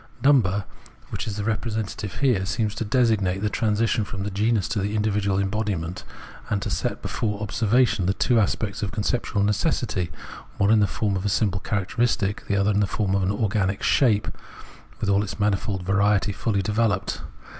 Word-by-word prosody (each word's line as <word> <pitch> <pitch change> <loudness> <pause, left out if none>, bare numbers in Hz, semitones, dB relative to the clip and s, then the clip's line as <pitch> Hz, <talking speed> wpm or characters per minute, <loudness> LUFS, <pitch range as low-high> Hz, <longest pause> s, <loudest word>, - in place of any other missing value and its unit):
Number, 105 -9 +4 0.5
which - - -4
is 105 - -3
the 105 - -2
representative 110 -2 -3
here, 125 -9 +3
seems 105 +1 -1
to 115 - -3
designate 105 -5 +1
the 105 - 0
transition 110 0 +1
from 100 -1 -5
the 100 - -3
genus 105 0 +1
into 110 - -2
the 100 +2 -1
individual 105 -2 +1
embodiment, 95 -4 -2 0.5
and 105 - +1
to 105 - -3
set 80 - -2
before 105 -3 -2
observation 110 -1 +2
the 95 - +1
two 120 +1 +3
aspects 105 0 -1
of 100 - -2
conceptual 105 -1 -1
necessity, 105 - 0 0.5
one 100 0 +3
in 110 - +5
the 105 - +3
form 105 -1 -1
of 95 - -2
a 105 - 0
simple 100 -2 +1
characteristic, 105 0 0
the 100 - +1
other 100 +1 +2
in 100 - +1
the 105 - +2
form 95 +1 -1
of 100 - +2
an 95 +1 +1
organic 100 -2 0
shape 110 -6 +3 0.7
with - - -2
all 100 0 +3
its 105 0 -5
manifold 100 -2 0
variety 100 +2 +2
fully 100 0 -1
developed. 105 -1 0
105 Hz, 180 wpm, -24 LUFS, 100-110 Hz, 0.7 s, in